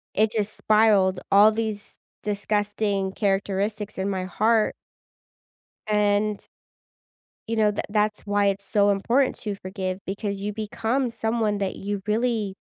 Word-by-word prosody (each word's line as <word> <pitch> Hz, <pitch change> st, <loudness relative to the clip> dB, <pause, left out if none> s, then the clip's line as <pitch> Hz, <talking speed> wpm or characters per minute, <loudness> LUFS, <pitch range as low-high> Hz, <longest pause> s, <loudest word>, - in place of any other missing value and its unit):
It 215 Hz, +1 st, +3 dB
just 215 Hz, -2 st, -2 dB
spiraled 205 Hz, -4 st, +3 dB
all 205 Hz, +2 st, +7 dB
these 215 Hz, -2 st, -4 dB, 0.3 s
disgusting 205 Hz, -1 st, -1 dB
characteristics 200 Hz, +1 st, -1 dB
in 190 Hz, +1 st, -1 dB
my 185 Hz, -1 st, -2 dB
heart 215 Hz, +4 st, +2 dB, 1.1 s
and 210 Hz, 0 st, +1 dB, 1.0 s
you 230 Hz, -, -1 dB
know, 210 Hz, -1 st, +3 dB
th -, -, -2 dB
that's 210 Hz, 0 st, 0 dB
why 205 Hz, 0 st, +2 dB
it's 200 Hz, +1 st, -12 dB
so 205 Hz, 0 st, +3 dB
important 235 Hz, +7 st, +2 dB
to 210 Hz, -2 st, -3 dB
forgive, 185 Hz, -1 st, -4 dB
because 200 Hz, 0 st, -3 dB
you 210 Hz, -, -2 dB
become 225 Hz, +4 st, -1 dB
someone 220 Hz, -2 st, -1 dB
that 195 Hz, -2 st, -2 dB
you 200 Hz, 0 st, -4 dB
really, 220 Hz, -2 st, 0 dB
210 Hz, 135 wpm, -24 LUFS, 200-215 Hz, 1.1 s, all